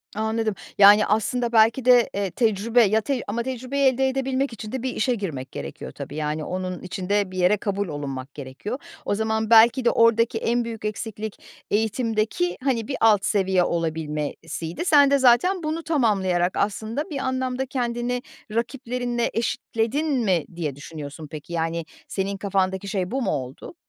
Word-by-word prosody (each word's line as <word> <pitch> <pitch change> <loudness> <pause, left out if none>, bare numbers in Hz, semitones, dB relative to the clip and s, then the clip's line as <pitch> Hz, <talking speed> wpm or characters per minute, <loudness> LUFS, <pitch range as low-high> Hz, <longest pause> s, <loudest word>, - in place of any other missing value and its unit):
Anladım, 220 -1 -1 0.2
yani, 205 +1 +8
aslında 235 +3 0
belki 225 +3 +4
de, 245 -2 +6
eee, 195 -3 -2
tecrübe, 230 +1 +2
ya, 215 +2 +3
tec 255 +2 -2
ama 230 +3 -2
tecrübeyi 260 +2 -1
elde 265 +1 +2
edebilmek 265 -1 -1
için 215 -1 -8
de 260 -1 -4
bir 260 - -2
işe 245 +2 +1
girmek 145 - -5
gerekiyor 70 0 -7
tabii. 145 - -8
Yani, 155 0 -2
onun 185 +1 -4
için 185 +1 -6
de 205 -2 +1
bir 185 - -7
yere 185 +4 +3
kabul 200 -1 -2
olunmak 140 -3 -5
gerekiyor. 145 - -6 0.3
O 205 - 0
zaman 220 0 -1
belki 235 +2 +6
de - - +6
oradaki 230 0 +3
en 235 +1 0
büyük 225 -2 -6
eksiklik 215 0 -5 0.3
eğitimdeki, 225 - 0
hani, 245 -5 0
bir 275 - -3
alt 210 -3 +5
seviye 190 -3 +2
olabilmesiydi. 160 - -3
Sen 285 -4 +6
de 280 - +4
zaten 265 +9 +4
bunu 315 +2 -2
tamamlayarak 195 - +1
aslında 220 +9 -2
bir 285 - -4
anlamda 260 0 -1
kendini 245 -1 -2 0.3
rakiplerinle 240 0 -2
eşitledin 230 +5 -1 0.2
mi 175 -6 +2
diye 150 -6 -3
düşünüyorsun 150 +1 -8
peki, 155 +2 -8
yani, 165 0 -1 0.2
senin 195 0 -2
kafandaki 195 -1 -1
şey 190 -1 -2
bu 270 +1 -1
mu - - 0
oldu? 135 - -5
220 Hz, 165 wpm, -24 LUFS, 185-245 Hz, 0.3 s, yani